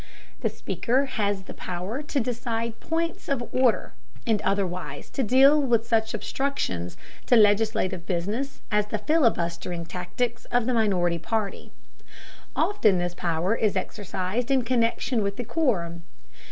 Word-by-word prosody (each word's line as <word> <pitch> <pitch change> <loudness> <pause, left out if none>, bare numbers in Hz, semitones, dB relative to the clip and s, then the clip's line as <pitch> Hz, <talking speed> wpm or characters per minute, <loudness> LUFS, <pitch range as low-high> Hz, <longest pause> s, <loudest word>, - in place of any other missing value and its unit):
The - - 0
Speaker 260 +4 0
has 205 -6 -1
the - - -9
power 185 +9 -4
to 295 -1 -1
decide 230 -1 -2
points 330 0 -2
of 245 -4 -1
order, 255 -3 +2 0.3
and 220 -4 +2
otherwise 185 -2 -2
to - - -1
deal 270 +5 +6
with 235 -4 +2
such 225 -1 +1
obstructions 205 - -2 0.3
to 245 - +6
legislative 205 -4 +3
business 205 +10 -2
as 210 0 +2
the 215 - -2
filibustering 180 - +1
tactics 225 +8 -3
of 245 -2 +1
the 255 - +1
minority 180 -7 +2
party. 215 +3 -3 0.8
Often 220 - +3
this 175 0 -1
power 175 +3 0
is 220 -3 +1
exercised 205 +4 -3
in 265 -2 +3
connection 235 0 +1
with 200 -1 -2
the 245 - -3
quorum. 180 - 0
220 Hz, 140 wpm, -26 LUFS, 185-250 Hz, 0.8 s, deal